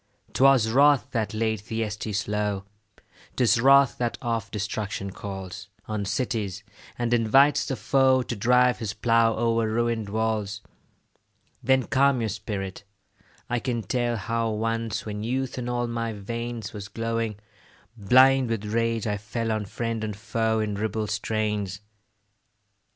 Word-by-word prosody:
'Twas 135 -4 +5
wrath 140 0 +4
that 110 -3 -1
laid 110 0 -1
Thyestes 105 -2 -3
low; 105 -1 -1 0.7
'Tis 120 -2 +3
wrath 135 0 +5
that 120 -1 -1
oft 115 -3 -2
destruction 105 -1 -3
calls 95 +1 -7 0.2
On 105 -2 -3
cities, 105 -4 -2 0.3
and 120 0 0
invites 135 +5 +4
the 135 - -1
foe 130 -1 +3
To 120 - -4
drive 125 +4 +3
his 105 -3 -3
plough 115 0 +3
o'er 115 -1 +1
ruin'd 115 -2 -1
walls. 105 -1 -1 1.0
Then 130 0 +3
calm 140 0 +2
your 110 -2 -1
spirit; 100 -1 -5 0.6
I 120 - 0
can 120 -2 -2
tell 120 +3 -1
How 115 +3 -1
once, 115 +1 -2
when 105 -1 -5
youth 130 +2 -2
in 120 0 -4
all 120 0 0
my 115 -1 -3
veins 115 +1 -5
Was 100 -2 -7
glowing, 115 -1 -2 0.6
blind 130 +4 +5
with 110 -2 -2
rage, 115 +1 0
I 105 -2 -1
fell 115 +2 -3
On 110 -1 -1
friend 115 +2 -3
and 105 -2 -3
foe 110 +1 0
in 105 -1 -2
ribald 105 0 -2
strains. 105 -2 -2
115 Hz, 140 wpm, -25 LUFS, 105-120 Hz, 1.0 s, Twas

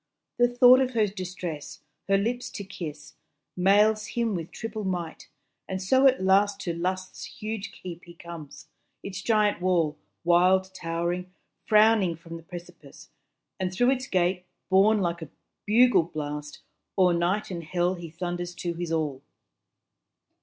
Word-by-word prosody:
The 245 - +6
thought 245 +1 +7
of 255 -1 0
her 220 -2 +4
distress, 185 -6 -6 0.2
her 195 0 +4
lips 240 +5 -2
to 220 -6 -5
kiss, 155 -6 -8 0.4
Mails 210 +3 +3
him 235 -2 -1
with 170 -3 -4
triple 220 -1 -6
might; 175 -4 -4 0.4
and 190 0 -2
so 260 +9 +4
at 260 -7 +2
last 200 +1 +3
To 170 - -2
Lust's 185 +2 -3
huge 215 -1 -6
keep 175 -1 -9
he 170 -1 -13
comes; 170 -4 -10 0.4
its 195 -1 -6
giant 210 -4 +2
wall, 170 -5 +1 0.2
Wild 185 +2 +3
towering, 175 +1 -3 0.4
frowning 215 -5 +4
from 165 +1 -10
the 165 - -8
precipice; 175 +1 -12 0.5
And 185 -1 -1
through 245 +7 +3
its 260 -1 -2
gate, 180 0 0 0.2
borne 205 +3 +5
like 170 -1 -1
a 160 - -7 0.4
bugle 245 +2 +5
blast, 150 -1 -5 0.4
O'er 180 -2 +5
night 180 +5 0
and 170 -2 -5
hell 175 +2 0
he 175 -2 -8
thunders 175 +1 -4
to 175 -1 -3
his 170 0 -5
all. 150 -5 -1
185 Hz, 150 wpm, -26 LUFS, 170-210 Hz, 0.5 s, thought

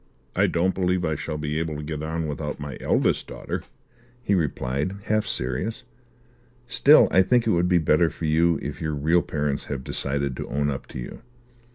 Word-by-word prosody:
"I - - +4
don't 90 +3 +1
believe 90 -1 0
I 80 - 0
shall 75 +1 -4
be 75 +1 -2
able 80 -2 -3
to 75 - -6
get 75 0 -4
on 80 +1 -2
without 75 0 -4
my 70 -2 -6
eldest - - +1
daughter," - - -5 0.6
he 100 - +1
replied, 75 0 -1
half 110 0 0
serious. 65 - -2 0.8
"Still 125 +5 +6
I 95 - +6
think 120 +5 +3
it 110 - +2
would 90 0 +2
be 90 - +4
better 80 +1 +3
for 80 - -6
you 80 +2 +3
if 75 - -5
your 75 -2 -1
real 80 +5 +3
parents 75 -3 -2
have 70 -3 -4
decided 70 0 -2
to - - -5
own 70 0 0
up 65 - -6
to - - -9
you. - - -7
80 Hz, 195 wpm, -25 LUFS, 75-90 Hz, 0.8 s, Still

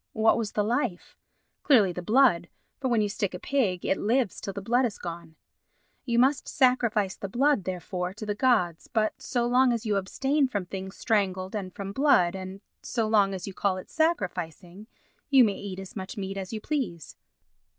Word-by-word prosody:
What 220 0 +4
was 225 -3 -3
the 210 - +1
life? 215 -5 -2 0.5
Clearly 220 -10 +4
the 180 - -5
blood, 210 -4 +3 0.3
for 265 - -1
when 235 -3 +2
you 210 - +1
stick 200 -2 -3
a - - -6
pig 210 -11 0
it 190 - +1
lives 230 -1 0
till 195 - -4
the 200 - -6
blood 240 +6 +1
is 230 -5 -1
gone. 170 -2 -8 0.7
You 235 -2 0
must 265 +3 +3
sacrifice 235 -6 +2
the 195 - -6
blood, 265 -2 +2
therefore, 180 0 -3
to 215 - -7
the 210 - -1
gods, 205 -8 +1
but 215 -1 -1
so 240 -2 -1
long 250 +1 +4
as 235 -1 -2
you 210 -2 +1
abstain 270 +9 +1
from 205 -7 -3
things 190 +1 -7
strangled 190 -3 0
and 190 -3 -4
from 195 +1 -6
blood, 200 -11 +3
and 190 +1 -7 0.2
so 230 -3 -1
long 200 -3 +3
as 185 - -6
you 195 - -7
call 190 0 0
it 185 - -10
sacrificing, 185 - -2 0.4
you 270 -3 +7
may 205 -4 +1
eat 195 -2 -6
as 195 -1 -9
much 190 +2 -6
meat 195 -1 -4
as 190 -1 -5
you 220 - -4
please. 220 - -4
205 Hz, 195 wpm, -27 LUFS, 185-240 Hz, 0.7 s, you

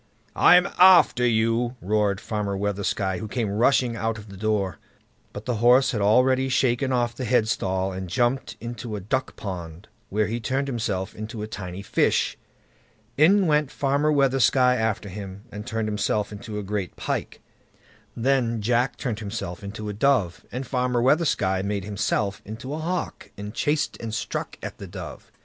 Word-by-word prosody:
"I'M 180 +2 +6
AFTER 180 -9 +7
YOU", 115 +2 +1
roared 105 -1 +1
Farmer 105 -3 -3
Weathersky, 100 -1 -1
who 110 - -5
came 110 -2 -2
rushing 120 +2 +2
out 110 0 -2
of 105 0 -11
the 100 - -10
door. 100 -2 -1 0.5
But 105 - -8
the 125 -3 -1
horse 125 +4 +5
had 105 - -2
already 130 +5 +3
shaken 130 +1 +1
off 120 -2 +1
the 130 - -6
headstall, 95 -5 +1
and 95 -1 -5
jumped 120 +7 0
into 115 -1 -6
a - - -4
duck 130 +8 -2
pond, 90 -2 -7 0.2
where 105 +2 +1
he 115 +3 -3
turned 130 +5 -1
himself 105 -6 -2
into 110 0 -6
a - - -4
tiny 95 -2 -7
fish. - - +1 0.8
In 190 +8 +5
went 150 -3 +2
Farmer 145 +3 +1
Weathersky 135 -3 +3 0.2
after 110 -3 -1
him, 100 0 -8
and 105 +2 -7
turned 110 -2 -2
himself 105 0 -1
into 105 +1 -7
a 105 - -3
great 100 -2 -3
pike. - - -3 0.8
Then 120 -2 +1
Jack 120 +4 +1
turned 115 -5 -3
himself 100 -4 -5
into 105 +2 -6
a 105 - -3
dove, 105 -6 +1
and 130 +2 -4
Farmer 125 -1 0
Weathersky 130 - +2
made 100 -1 -2
himself 100 -1 -1
into 115 +6 -7
a 155 - -3
hawk, 175 +3 -3
and 105 +1 -6
chased 150 +4 0
and 110 -1 -4
struck - - -4
at - - -6
the 100 - -7
dove. 90 -6 -9
110 Hz, 165 wpm, -25 LUFS, 100-125 Hz, 0.8 s, AFTER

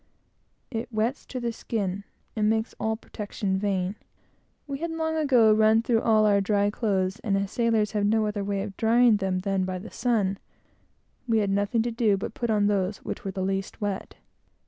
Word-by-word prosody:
It 235 +1 -4
wets 225 +4 -1
to 255 - -5
the 235 -1 -2
skin, 200 -4 -3 0.3
and 215 -1 +2
makes 220 +1 0
all 220 0 -1
protection 205 -3 -3
vain. 195 -1 -1 0.7
We 280 -2 -5
had 335 +2 -2
long 320 0 -2
ago 255 -8 +5
run 220 +1 +4
through 230 -1 +2
all 215 -1 +4
our 200 -1 +4
dry 205 0 +1
clothes, 195 -2 -1
and 200 -4 0
as 195 0 -2
sailors 225 -3 +1
have 205 -1 +1
no 220 +1 +2
other 210 -1 -2
way 200 -1 -1
of 200 -2 -7
drying 230 0 +4
them 190 -2 -1
than 195 0 0
by 185 0 -3
the 195 +5 -9
sun, 210 -6 0 0.9
we 225 -1 +2
had 205 -2 +1
nothing 205 +3 +1
to 240 - -2
do 225 -3 +2
but 195 - -5
to - - -19
put 235 - -1
on 210 -2 +3
those 200 -1 +1
which - - -5
were 195 - -3
the 190 0 -3
least 195 +1 -3
wet. 205 -2 -3
210 Hz, 200 wpm, -26 LUFS, 195-230 Hz, 0.9 s, ago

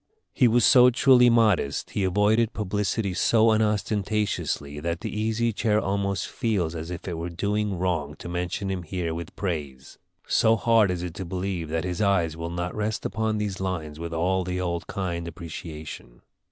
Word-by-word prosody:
He 125 - +4
was 120 0 +4
so 125 -1 +7
truly 125 0 +5
modest, 110 -11 +2
he 100 - -1
avoided 105 +4 +2
publicity 105 0 -1
so 110 +4 +4
unostentatiously, 105 -8 -1
that 85 +2 -3
the - - -5
Easy 110 +2 0
Chair 105 0 +1
almost 100 -1 -1
feels 100 -9 -1
as 80 0 -6
if 90 +1 -7
it 85 -3 -3
were 85 +1 -3
doing 100 +2 -1
wrong 85 -5 -1
to - - -9
mention 90 +3 -3
him 95 -2 -2
here 85 0 -3
with 85 0 -7
praise; 75 -8 -5 0.3
so 110 0 +3
hard 115 -2 +3
is 90 -1 -2
it 90 -2 -5
to 95 - -5
believe 90 -2 -3
that 80 0 -1
his 90 0 -3
eyes 90 -6 +2
will 85 0 -5
not 90 +1 -3
rest 105 0 -2
upon 110 +2 -1
these 105 -2 -3
lines 80 -5 -4
with 85 0 -5
all 90 +3 +1
the 90 0 -3
old 85 -2 -2
kind 85 -3 -3
appreciation. 80 -6 -8
95 Hz, 180 wpm, -25 LUFS, 85-105 Hz, 0.3 s, so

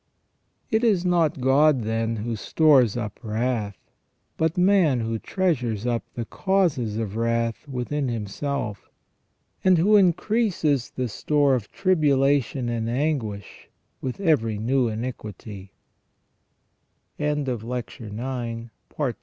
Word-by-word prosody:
It 220 +1 +2
is 200 -6 +2
not 170 -5 +2
God, 135 0 +4
then, 115 +1 -1
who 115 +2 -3
stores 130 -1 +3
up 105 -4 -5
wrath, 110 -2 -2 0.6
but 160 +1 0
man 180 -9 +4
who 115 0 -2
treasures 125 - -1
up 120 -1 0
the 120 - -3
causes 155 - 0
of 110 -3 -3
wrath 115 +2 -1
within 135 +2 -2
him 115 -3 -2
self, 110 -2 -4 0.7
and 185 -2 +5
who 205 +6 +5
increases 180 - +1
the 130 -1 -3
store 145 +5 +1
of 120 -5 -2
tribulation 140 - +2
and 115 -1 -2
anguish 120 - -3 0.3
with 130 +4 -4
every 120 - +2
new 125 +4 +1
in 110 +1 -3
130 Hz, 105 wpm, -24 LUFS, 115-160 Hz, 0.7 s, and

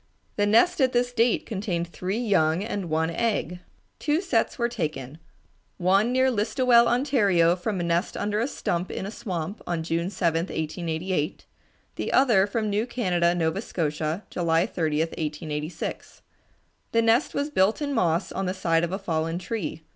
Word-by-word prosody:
The 205 0 +1
nest 275 - +4
at 255 -1 +3
this 245 0 +1
date 235 0 +2
contained 190 -5 -2
three 185 +4 -4
young 190 -7 +2
and 205 -5 -4
one 160 +1 0
egg. 180 -4 -1 0.4
Two 300 +1 +1
sets 260 - 0
were 235 - +1
taken, 155 - -4 0.6
one 195 +6 +3
near 260 +1 +3
Listowel, 235 +2 +3
Ontario, 205 - +3
from 185 +2 -3
a - - -1
nest 170 +3 0
under 210 +1 -1
a 235 - +1
stump 175 -9 -2
in - - -4
a 200 - -5
swamp, 185 -3 -5
on 170 -2 -1
June 165 +2 -1
7, 170 -3 0
1888; 160 +1 -3 0.5
the - - -2
other 225 -8 +4
from 215 +1 -1
New 210 +3 0
Canada, 180 -8 +1
Nova 165 +3 0
Scotia, 155 -1 -2
July 170 0 +2
30, 155 -3 -1
1886. 155 0 -4 0.7
The 230 0 +3
nest 230 +5 +2
was 285 +1 -1
built 195 -2 +2
in 285 -2 -2
moss 175 -6 +1
on 195 - -2
the 185 - -2
side 165 -3 +1
of 170 - -1
a 190 - -1
fallen 165 -4 -2
tree. 180 -4 -4
185 Hz, 165 wpm, -25 LUFS, 165-230 Hz, 0.7 s, nest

